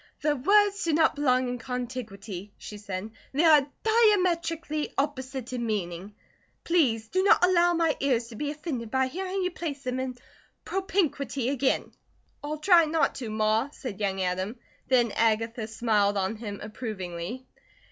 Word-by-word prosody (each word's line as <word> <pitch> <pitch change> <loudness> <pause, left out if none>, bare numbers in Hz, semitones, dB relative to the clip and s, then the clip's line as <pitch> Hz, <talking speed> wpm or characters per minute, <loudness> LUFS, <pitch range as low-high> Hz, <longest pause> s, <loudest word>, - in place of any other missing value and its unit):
"The 295 0 +2
words 400 +8 +3
do 330 - +1
not 320 +1 +4
belong 255 -3 +2
in 245 0 -3
contiguity," 225 -6 -6
she 210 - -9
said. 200 +1 -5 0.2
"They 290 +5 +2
are 300 -4 +6 0.2
diametrically 345 -9 +2
opposite 265 -3 -3
in 245 -1 -2
meaning. 200 -2 -3 0.5
Please 250 -11 +2
do 370 +8 +1
not 400 -1 +5
allow 350 -1 +4
my 330 -2 +2
ears 250 -4 +1
to 230 - -10
be 290 +6 -3
offended 290 -7 -4
by 265 +2 +2
hearing 375 +7 -3
you 365 - 0
place 295 -5 -5
them 255 0 -2
in 260 -1 -4 0.5
propinquity 320 -9 -1
again." 270 -1 0 0.5
"I'll 300 +1 -3
try 340 +1 +5
not 315 +1 +1
to, 235 - -4
Ma," 215 +4 +1
said 250 -8 -7
young 195 -2 -1
Adam; 185 +5 -2 0.3
then 245 -3 +3
Agatha 225 +1 0
smiled 215 -3 +1
on 195 +3 -1
him 205 -3 -6
approvingly. 210 0 -6
255 Hz, 155 wpm, -27 LUFS, 220-320 Hz, 0.5 s, are